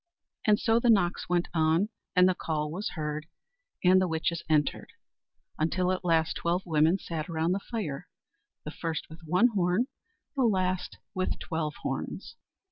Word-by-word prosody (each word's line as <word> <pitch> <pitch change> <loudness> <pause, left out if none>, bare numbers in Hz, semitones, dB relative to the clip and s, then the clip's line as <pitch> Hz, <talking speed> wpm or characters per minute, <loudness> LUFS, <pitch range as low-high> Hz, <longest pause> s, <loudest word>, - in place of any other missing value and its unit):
And 210 -1 +5
so 225 +1 +3
the 240 - +2
knocks 185 -7 +2
went 175 -1 +2
on, 165 +5 +2 0.3
and 180 0 +7
the 185 - +3
call 150 -3 -2
was 190 +6 -3
heard, 150 -1 -3 0.6
and 185 +1 +6
the 185 - +2
witches 165 0 -1
entered, 150 -2 +1 0.7
until 180 +3 +1
at 185 0 -2
last 165 -2 +2
twelve 175 +2 0
women 160 +1 +3
sat 165 -3 -5
round 165 +1 +1
the 195 - -1
fire 195 - -4 0.6
the 150 - -4
first 160 -1 -4
with 160 - -10
one 180 +10 +4
horn, 190 +1 +1 0.5
the 270 - +1
last 185 -5 +1 0.2
with 185 -2 -1
twelve 160 -3 -3
horns. - - -4
175 Hz, 160 wpm, -29 LUFS, 160-185 Hz, 0.7 s, and